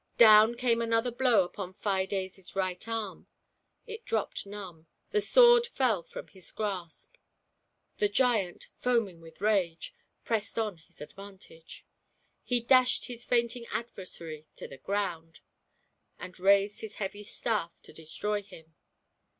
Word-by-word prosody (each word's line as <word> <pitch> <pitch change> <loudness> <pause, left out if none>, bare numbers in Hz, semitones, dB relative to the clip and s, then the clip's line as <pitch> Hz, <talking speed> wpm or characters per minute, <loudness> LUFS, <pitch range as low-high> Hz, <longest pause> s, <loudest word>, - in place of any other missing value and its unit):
Down 220 0 +8
came 235 -1 +1
another 230 +1 +1
blow 240 -4 +4
upon 185 +1 -7
Fides' 190 -1 -3
right 185 +1 -2
arm. 225 -4 -4 0.6
It 450 -1 -8
dropped 220 -2 -2
numb 185 -6 -9
— - - -47
the 425 - +2
sword 480 +1 +6
fell 250 - +1
from - - -9
his 190 -2 -13
grasp. 190 -6 -5 0.8
The 205 - +2
giant, 210 -5 +1
foaming 230 -9 0
with 165 +2 -15
rage, 200 - 0 0.3
pressed 220 -2 -2
on 215 -5 -1
his 165 - -15
advantage; 190 -1 -11 0.6
he 245 -1 +1
dashed 255 +1 +4
his 240 -1 -7
fainting 235 0 0
adversary 170 -8 -6
to - - -7
the 135 - -12
ground, 165 -3 -3 0.8
and 185 0 -9
raised 200 +2 +3
his 215 -1 -7
heavy 205 0 -4
staff* 205 -5 -3
to - - -13
destroy 205 +6 -3
him. 160 -5 -15
205 Hz, 135 wpm, -30 LUFS, 180-235 Hz, 0.8 s, Down